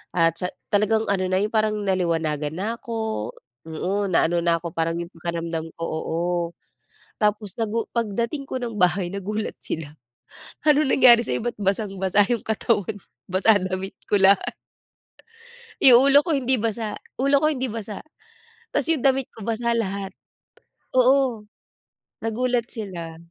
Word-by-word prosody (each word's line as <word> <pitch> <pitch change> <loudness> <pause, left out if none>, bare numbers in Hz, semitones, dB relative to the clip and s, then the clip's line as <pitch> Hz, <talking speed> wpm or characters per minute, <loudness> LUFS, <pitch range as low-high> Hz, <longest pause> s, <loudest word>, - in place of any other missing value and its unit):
at 165 -1 +3
sa 180 - -1 0.2
talagang 215 +2 +2
ano 190 -2 0
na, 185 - +3
yung 210 +1 -1
parang 215 -1 +2
naliwanagan 165 -6 0
na 190 +4 -3
ako. 220 - -3 0.4
Oo, 190 +6 -2
na 170 - +4
ano 170 +1 0
na 170 -1 +3
'ko, 165 -1 -7
parang 165 0 0
yung 170 +1 -6
pakiramdam 165 -1 -4
ko - - -4
oo, 160 +1 -3 1.0
tapos 210 -2 0
nagu 225 0 -1
pagdating 235 +5 -2
ko 260 -1 -4
ng 235 -3 -4
bahay, 180 -1 +2
nagulat 200 +3 -4
sila, 150 -2 -5 0.7
ano 300 0 +4
nangyari 250 -3 +7
sa'yo - - -1
ba't 240 0 -3
basang-basa 195 -1 +1
yung 240 -2 -1
katawan, 220 -2 0 0.3
basa 195 +3 +4
damit 185 +1 -4
ko 205 -2 +2
lahat. 195 0 +4 1.3
Yung 260 +1 +8
ulo 285 +1 +6
ko 335 - 0
hindi 260 -2 +2
basa. 220 -1 -2 0.2
Ulo 275 +2 +4
ko 305 - +2
hindi 260 -2 -2
basa. 215 -2 -6 0.7
Tapos - - 0
yung 310 -6 +1
damit 270 -1 +2
ko 220 - -10
basa 235 +2 0
lahat. 200 -3 -3 0.8
Oo, 255 -3 +3 0.8
nagulat 240 +1 -1
sila. 175 -7 -6
210 Hz, 145 wpm, -23 LUFS, 180-235 Hz, 1.3 s, Yung